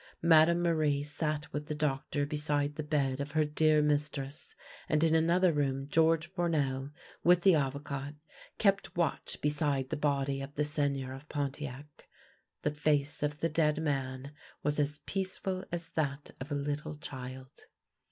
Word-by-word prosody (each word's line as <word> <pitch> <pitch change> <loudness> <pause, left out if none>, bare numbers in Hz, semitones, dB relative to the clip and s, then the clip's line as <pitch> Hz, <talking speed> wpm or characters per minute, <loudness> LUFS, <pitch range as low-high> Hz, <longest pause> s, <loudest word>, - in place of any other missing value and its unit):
Madame 170 +1 +6
Marie 155 -4 +2
sat 150 +1 -3
with 150 0 -3
the 150 - -3
doctor 145 -1 -1
beside 145 0 0
the 155 - -3
bed 140 -3 0
of 140 +1 -4
her 155 -1 +3
dear 155 0 +3
mistress, 145 -1 -1 0.3
and 155 0 +3
in 160 -1 +4
another 170 +2 +4
room 135 -2 0
George 160 +1 +3
Four 175 -1 -1
nel, 135 -3 0 0.3
with 175 0 +6
the 190 - +7
Avocat, 140 0 -2 0.4
kept 195 -3 +1
watch 170 -3 -1
beside 145 -3 +1
the - - +1
body 140 -2 0
of 135 +1 -7
the 150 - +1
Seigneur 140 -3 -1
of 135 +3 -11
Pontiac. 145 0 -5 0.6
The 150 - +1
face 145 -1 0
of 150 0 -2
the 165 - +2
dead 155 -1 +2
man 135 -3 -2 0.3
was 150 +1 +1
as 145 0 -1
peaceful 190 -1 -2
as 170 -1 -4
that 145 -2 -2
of 145 +3 -6
a - - +1
little 145 +2 -3
child. 130 -2 -9
150 Hz, 160 wpm, -31 LUFS, 140-160 Hz, 0.6 s, the